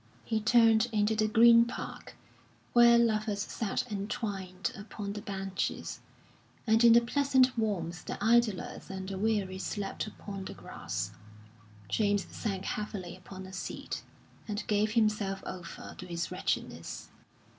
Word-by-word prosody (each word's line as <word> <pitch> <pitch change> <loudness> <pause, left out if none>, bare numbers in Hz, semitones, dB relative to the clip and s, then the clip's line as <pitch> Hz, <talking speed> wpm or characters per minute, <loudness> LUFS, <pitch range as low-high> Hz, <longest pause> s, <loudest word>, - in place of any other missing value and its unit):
He 220 -1 0
turned 225 0 +5
into 215 0 +2
the 215 0 +2
Green 230 +2 +7
Park, 235 - -7 0.6
where 235 0 +8
lovers 215 -3 +1
sat 220 0 -2
entwined 195 -2 -3
upon 205 -1 -6
the 210 - -5
benches, 195 -3 -3 0.7
and 225 0 +4
in 235 -1 +9
the 235 - +7
pleasant 260 +1 +3
warmth 180 -7 -2
the - - -4
idlers 225 -3 +1
and 190 -1 -5
the 190 -1 -4
weary 200 -3 0
slept 200 +1 -3
upon 200 -2 -7
the - - -7
grass. 95 +3 -5 0.8
James 205 - +1
sank 195 -4 -3
heavily 200 -4 -4
upon 190 +1 -10
a 190 - -10
seat, 190 - -5 0.5
and 210 0 -3
gave 210 0 +1
himself 210 -4 +1
over 180 -2 -7
to 185 - -7
his 170 -1 -3
wretchedness. 185 +1 -3
210 Hz, 135 wpm, -31 LUFS, 190-225 Hz, 0.8 s, in